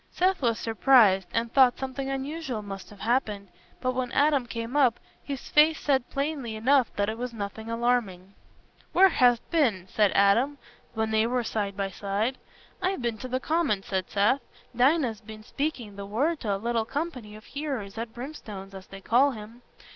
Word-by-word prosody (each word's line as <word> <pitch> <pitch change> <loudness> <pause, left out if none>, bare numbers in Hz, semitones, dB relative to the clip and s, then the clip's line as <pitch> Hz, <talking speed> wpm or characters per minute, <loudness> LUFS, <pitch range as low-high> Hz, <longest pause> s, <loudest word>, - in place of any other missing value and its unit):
Seth 370 -1 +1
was 230 -3 +1
surprised, 225 -5 +4
and 230 0 -1
thought 260 -3 +5
something 265 0 -4
unusual 270 -3 -4
must 195 -1 -8
have 205 - -14
happened, 215 -5 -1 0.3
but 255 0 0
when 255 -1 -2
Adam 285 -4 +3
came 230 +2 -5
up, 260 -5 +3 0.2
his 275 -3 -6
face 310 +1 +5
said 265 -4 +1
plainly 275 -5 -3
enough 255 +3 +3
that 205 0 0
it 220 +2 -4
was 245 -1 -4
nothing 220 +2 -6
alarming. 230 -6 -1 0.6
"Where 385 +1 +7
hast 245 -7 +3
been?" 230 - +1
said 205 0 +2
Adam, 230 +9 +3 0.4
when 220 0 -1
they 220 +1 +3
were 250 0 0
side 205 -3 -3
by 195 -1 -2
side. 205 +7 -2 0.4
"I've 370 -8 -1
been 230 -2 -2
to 255 - -6
the 255 +1 -1
Common," 295 - 0
said 190 -2 -3
Seth. 210 +7 +2 0.3
"Dinah's 250 -3 +2
been 215 0 -11
speaking 245 -5 -4
the 200 0 -6
Word 290 +10 0
to 205 -4 -1
a - - -2
little 230 +2 -1
company 255 -6 -5
of 215 - -12
hearers 270 -9 -5
at 230 0 -5
Brimstone's, 220 -7 -8
as 190 -1 -10
they 195 0 -11
call 260 +7 +3
him. 225 +2 -11
235 Hz, 180 wpm, -27 LUFS, 210-270 Hz, 0.6 s, Where